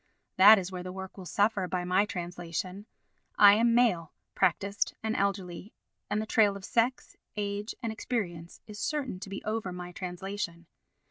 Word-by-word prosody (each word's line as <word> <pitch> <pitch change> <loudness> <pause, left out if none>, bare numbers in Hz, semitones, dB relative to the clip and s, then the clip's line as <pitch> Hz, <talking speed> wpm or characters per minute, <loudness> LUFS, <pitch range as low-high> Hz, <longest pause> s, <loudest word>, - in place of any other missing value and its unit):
That 205 +4 +9
is 190 -1 -3
where 180 -1 -5
the 180 0 -6
work 190 0 -8
will 185 -2 -9
suffer 205 -1 +1
by 180 -1 -2
my 185 +3 +2
translation. 180 +2 -5 0.5
I 200 -1 +9
am 230 +2 +3
male, 195 -10 +2 0.2
practised 200 0 0
and 220 0 -1
elderly, 195 0 -2 0.3
and 210 +1 0
the 215 - -2
trail 210 -2 +3
of 190 - -10
sex, 240 +2 0 0.2
age 205 +1 -3
and 230 - -1
experience 175 -8 -4
is 210 -1 -10
certain 270 -7 -2
to 200 - -8
be 195 - -6
over 215 -3 -2
my 180 0 -7
translation. 180 -1 -5
200 Hz, 165 wpm, -29 LUFS, 180-215 Hz, 0.5 s, That